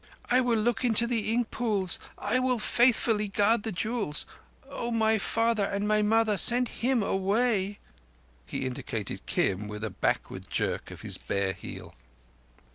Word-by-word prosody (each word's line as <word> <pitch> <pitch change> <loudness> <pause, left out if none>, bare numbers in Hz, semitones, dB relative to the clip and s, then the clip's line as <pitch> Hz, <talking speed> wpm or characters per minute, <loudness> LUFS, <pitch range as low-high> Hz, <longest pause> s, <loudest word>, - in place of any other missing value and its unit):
"I 255 +1 +5
will 240 -2 +1
look 235 +3 0
into 235 -1 +3
the 230 -3 -1
ink 235 0 0
pools—I 210 +1 -1
will 255 -1 +1
faithfully 225 -2 +3
guard 205 +3 +2
the 220 - -4
jewels! 210 -5 -2 0.4
Oh, 275 -4 -5
my 220 -1 +2
Father 230 +1 +1
and 200 +1 -2
my 215 0 +3
Mother, 215 0 +2
send 245 +3 +6
him 245 -2 0
away!" 200 +1 0 0.7
He 95 - -4
indicated 115 -5 -5
Kim 100 +2 0
with 105 0 -7
a 110 - -3
backward - - -3
jerk - - -2
of - - -10
his - - -4
bare 100 -1 -2
heel. - - -10
220 Hz, 150 wpm, -28 LUFS, 195-235 Hz, 0.7 s, send